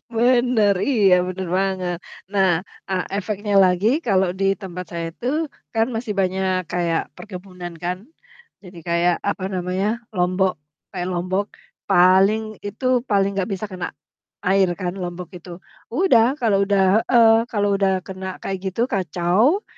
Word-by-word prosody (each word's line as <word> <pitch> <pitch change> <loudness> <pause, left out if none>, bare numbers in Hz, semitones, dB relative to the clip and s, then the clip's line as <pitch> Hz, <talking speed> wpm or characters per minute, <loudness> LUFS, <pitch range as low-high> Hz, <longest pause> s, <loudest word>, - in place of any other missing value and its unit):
Benar, 240 -3 +3
iya 205 -9 +5
benar 185 0 -4
banget. 190 -2 -1 0.4
Nah, 195 -2 +3 0.4
eee, 185 -1 0
efeknya 205 +1 -2
lagi 180 +3 +2 0.2
kalau 190 -3 +3
di - - +2 0.2
tempat 180 -2 -6
saya 170 -1 -3
itu 235 - -8 0.5
kan 225 0 +3
masih 225 -1 -3
banyak 185 -1 0
kayak 170 -2 0
perkebunan 180 -3 -8
kan, 180 +1 -1 0.6
jadi 180 -2 -12
kayak 170 +1 +2
apa 195 - -4
namanya, 185 +2 -1 0.3
lombok 185 +1 +2 0.4
kayak 180 -2 -3
lombok, 185 +3 -1 0.4
paling 190 +4 +5 0.2
itu, 215 +6 -5 0.2
paling 200 -1 +3
nggak 195 +2 -1
bisa 195 +3 -5
kena 180 -1 -4 0.6
air 190 0 +4
kan 180 -2 -2
lombok 175 -1 -5
itu. 175 +1 -13 0.4
Udah, 250 -6 +4 0.2
kalau 200 -4 +3
udah 195 -1 +2 0.3
heeh, 230 -3 +7 0.2
kalau 205 -2 +1
udah 195 -1 +2
kena 190 -1 -6
kayak 195 -1 -3
gitu 215 +5 -1
kacau 190 - +2
190 Hz, 140 wpm, -21 LUFS, 180-205 Hz, 0.6 s, heeh